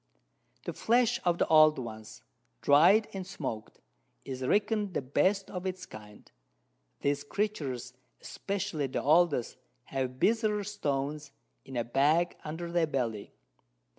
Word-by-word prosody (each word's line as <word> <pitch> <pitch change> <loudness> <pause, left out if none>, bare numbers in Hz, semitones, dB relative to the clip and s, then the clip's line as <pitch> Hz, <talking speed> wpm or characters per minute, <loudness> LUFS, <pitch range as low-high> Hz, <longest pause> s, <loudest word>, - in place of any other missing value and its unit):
The - - -4
Flesh 240 +1 +2
of 175 -1 +2
the - - +2
old 155 -1 +6
ones, 110 -3 -8 0.4
dried 175 +10 +6
and 195 - -4
smoaked, 115 - -6 0.5
is 130 -1 -6
reckon'd 205 - 0
the - - +1
best 185 +9 +1
of 180 0 -4
its 185 0 -5
kind. 105 -1 -13 0.7
These 145 0 0
Creatures, 145 - -3 0.3
especially 195 -7 -3
the 130 - -3
oldest, 155 -4 +3 0.3
have 130 -1 -3
Bezoar 215 - +2
Stones, 150 -7 -3 0.3
in 130 -2 -7
a 120 - +1
Bag 150 +8 +2
under 165 +3 -5
their 170 -2 +2
Belly. 115 -8 -3
155 Hz, 130 wpm, -30 LUFS, 130-190 Hz, 0.7 s, old